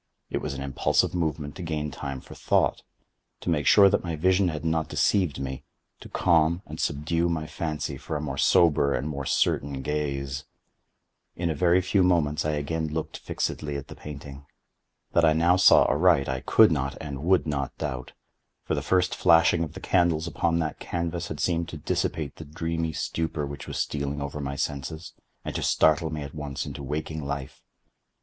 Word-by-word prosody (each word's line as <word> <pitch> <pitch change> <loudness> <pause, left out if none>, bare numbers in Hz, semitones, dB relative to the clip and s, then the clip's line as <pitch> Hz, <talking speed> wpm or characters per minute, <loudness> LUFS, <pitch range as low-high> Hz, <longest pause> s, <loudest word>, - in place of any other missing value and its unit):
It - - 0
was - - -4
an - - -5
impulsive 70 -1 +1
movement 75 -4 -2
to - - -6
gain 75 -3 -3
time 70 0 -5
for - - -12
thought—to - - -3
make 75 -4 0
sure 100 -2 +8
that - - +2
my 85 -2 -3
vision 95 +4 +3
had 80 -2 -3
not 80 -1 0
deceived 90 -8 +1
me—to 65 -1 -9
calm 85 +1 +2
and 75 +1 -9
subdue 85 +3 0
my 80 -2 -2
fancy 75 -1 -4
for 80 - -5
a - - -1
more 75 -1 -4
sober 75 -4 +4
and 70 - -2
more 70 -3 -4
certain 70 -1 0
gaze. 70 -2 -2 0.9
In 85 -1 -1
a - - 0
very 90 +4 +3
few 95 +2 +2
moments 85 -5 +2
I 75 - +1
again 80 +2 -2
looked 80 +1 -4
fixedly 75 -1 -3
at 70 - -8
the - - -9
painting. 70 -1 -9 0.6
That 85 - +3
I 80 -1 +5
now 85 +3 +4
saw 95 - +7
aright 80 -3 +3
I 65 0 -1
could - - +5
not - - -1
and 70 -2 -6
would 90 +2 +3
not 70 -3 -3
doubt; 65 -1 -5 0.5
for - - -2
the - - 0
first 90 -1 +1
flashing 85 -1 +4
of 80 - -6
the - - -8
candles 85 -3 +2
upon 85 0 0
that 80 -2 -2
canvas 85 0 -3
had 75 - -6
seemed 85 -1 0
to 80 - -7
dissipate 75 0 -2
the 80 - -8
dreamy 80 +2 -2
stupor 80 -1 -2
which 70 0 -7
was - - -5
stealing 70 0 -2
over 70 +1 -4
my 70 0 -3
senses, 75 +4 -4 0.3
and - - -4
to - - -3
startle 80 +1 +3
me 75 -1 -4
at 70 - -8
once 75 -2 -4
into - - -7
waking 75 +2 -4
life. 70 -1 -5
75 Hz, 185 wpm, -26 LUFS, 70-85 Hz, 0.9 s, sure